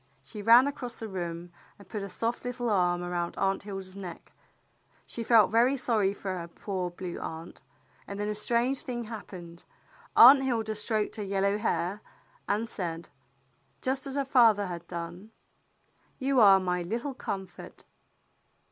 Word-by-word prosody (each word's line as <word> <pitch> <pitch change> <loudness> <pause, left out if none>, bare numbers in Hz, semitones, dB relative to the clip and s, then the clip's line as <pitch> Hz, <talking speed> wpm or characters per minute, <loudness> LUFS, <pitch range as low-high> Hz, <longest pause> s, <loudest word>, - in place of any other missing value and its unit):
She 210 - -9
ran 235 +5 +7
across 255 -4 -5
the 225 - -6
room 175 -3 -5 0.3
and 200 - -16
put 210 - -5
a 200 - -5
soft 230 +4 -3
little 245 -2 -2
arm 175 -3 +2
around 175 -1 -3
Aunt 195 0 0
Hilda's 195 -2 -8
neck. 185 -3 -9 0.7
She 235 - -6
felt 220 -4 +5
very 245 +5 +4
sorry 215 -6 +1
for 190 -2 -5
her 170 - -6
poor 185 +1 -4
Blue 175 0 -7
Aunt. 160 +1 -7 0.5
And 200 0 -6
then 205 - -1
a 210 - -1
strange 235 +5 0
thing 240 -2 -4
hap 220 -1 -8
pened. 170 -2 -10 0.5
Aunt 265 +3 +10
Hilda 225 -5 -1
stroked 215 0 -2
her 210 - -3
yellow 200 +1 0
hair, 205 -2 -1 0.5
and 215 +3 0
said, 170 -5 -5 0.7
just 265 +1 -1
as 270 - -5
her 280 -1 0
father 230 -6 +5
had 170 -2 -7
done, 175 +4 -7 0.4
*' - - -41
You 270 -1 +1
are 195 -3 +8
my 180 -1 -1
little 235 +10 -3
com 195 -6 -4
fort." 180 - -13
205 Hz, 165 wpm, -29 LUFS, 180-235 Hz, 0.7 s, Aunt